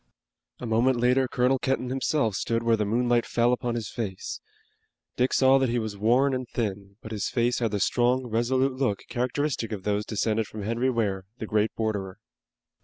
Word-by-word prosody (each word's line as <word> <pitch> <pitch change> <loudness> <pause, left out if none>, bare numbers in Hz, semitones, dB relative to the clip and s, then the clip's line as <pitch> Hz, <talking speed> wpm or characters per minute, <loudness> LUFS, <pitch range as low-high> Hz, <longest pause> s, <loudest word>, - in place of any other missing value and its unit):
A - - -6
moment 120 +3 +2
later 125 +2 +3
Colonel 125 +2 +1
Kenton 130 -1 -1
himself 130 -3 0
stood 115 +4 -1
where 115 -1 +3
the 105 -1 -1
moonlight 120 +2 +2
fell 120 +1 +2
upon 120 -1 -2
his 115 -3 -3
face. 100 -6 -5 0.7
Dick 125 +1 +1
saw 135 0 +5
that 130 -2 +1
he 120 - 0
was 110 -3 -3
worn 125 +7 +3
and 130 -1 -3
thin, 100 -3 -4
but 110 - -8
his 105 -2 -2
face 120 0 +1
had 115 -2 +1
the 105 -1 -2
strong 125 +5 +2
and 120 - -9
resolute 130 +3 +1
look 130 -6 -1
characteristic 125 0 -1
of 100 -3 -5
those 105 0 0
descended 110 0 0
from 105 -1 -7
Henry 115 +5 0
Ware, 100 -6 -1
the 110 - -5
great 105 0 +1
borderer. 100 -4 -2
120 Hz, 190 wpm, -26 LUFS, 110-125 Hz, 0.7 s, saw